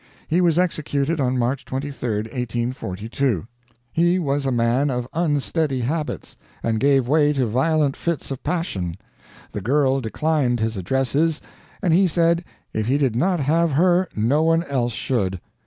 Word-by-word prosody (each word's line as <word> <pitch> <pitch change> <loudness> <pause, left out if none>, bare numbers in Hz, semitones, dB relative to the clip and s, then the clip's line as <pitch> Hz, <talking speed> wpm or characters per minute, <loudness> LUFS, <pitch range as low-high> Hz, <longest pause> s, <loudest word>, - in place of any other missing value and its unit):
He 170 +3 +2
was 170 -2 +3
executed 155 -3 0
on 130 -1 +1
March 125 +3 0
23, 130 -5 -3
1842. 120 - -2 0.5
He 175 +2 +3
was 140 -5 -1
a - - +1
man 120 +4 +2
of 125 -2 -2
unsteady 150 -3 0
habits, 150 +5 -3 0.3
and 110 -1 0
gave 135 -1 +3
way 150 +1 +3
to 135 -3 +1
violent 140 +5 +1
fits 170 -4 -3
of 135 - -4
passion. 95 - -2 0.5
The 105 - -5
girl 135 +4 +2
declined 130 +1 0
his 110 0 -1
addresses, 135 - 0 0.4
and 175 -4 +3
he 190 +3 +5
said 170 +1 +2 0.3
if 110 0 -1
he 135 +3 +2
did 135 -6 +1
not 175 +6 +1
have 160 +3 +2
her 180 +4 +3
no 120 +8 +2
one 165 +1 +3
else 125 -6 -1
should. 100 -7 -1
140 Hz, 155 wpm, -22 LUFS, 120-160 Hz, 0.5 s, he